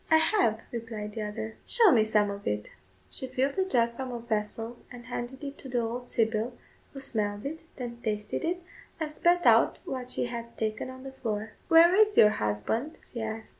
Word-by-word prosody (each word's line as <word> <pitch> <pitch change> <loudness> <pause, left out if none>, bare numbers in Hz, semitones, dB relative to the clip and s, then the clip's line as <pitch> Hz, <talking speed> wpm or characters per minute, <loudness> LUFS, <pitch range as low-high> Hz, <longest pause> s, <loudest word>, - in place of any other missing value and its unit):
"I 320 - +7
have," 320 - +3
replied 220 -3 -5
the 220 - -4
other. 215 +1 -5
"Show 455 -6 +5
me 225 -6 +5
some 210 -1 +2
of 200 0 -7
it." 105 0 -1 0.5
She 260 - 0
filled 270 +6 0
a 380 - +3
jug 235 -9 +2
from 260 0 -4
a 240 - -3
vessel 225 +1 -3
and 245 -1 -10
handed 250 +3 -5
it 280 0 -6
to 265 - -7
the 245 -1 +1
old 240 +2 -4
sybil, 225 +1 0 0.3
who 275 - -8
smelled 210 -4 -1
it, 315 +3 -4 0.2
then 240 -2 -6
tasted 210 -2 -2
it, 350 +2 -1 0.4
and 305 -1 -3
spat 350 +3 +3
out - - +6
what 255 -7 -4
she - - 0
had 235 -1 -6
taken 220 +3 -2
on 260 0 -10
the 270 - -7
floor. 220 -4 -3 0.2
"Where 335 +2 +7
is 425 +1 +4
your 210 - +8
husband?" 105 - -1
she 235 - -6
asked. 220 0 -4
240 Hz, 205 wpm, -29 LUFS, 220-270 Hz, 0.5 s, your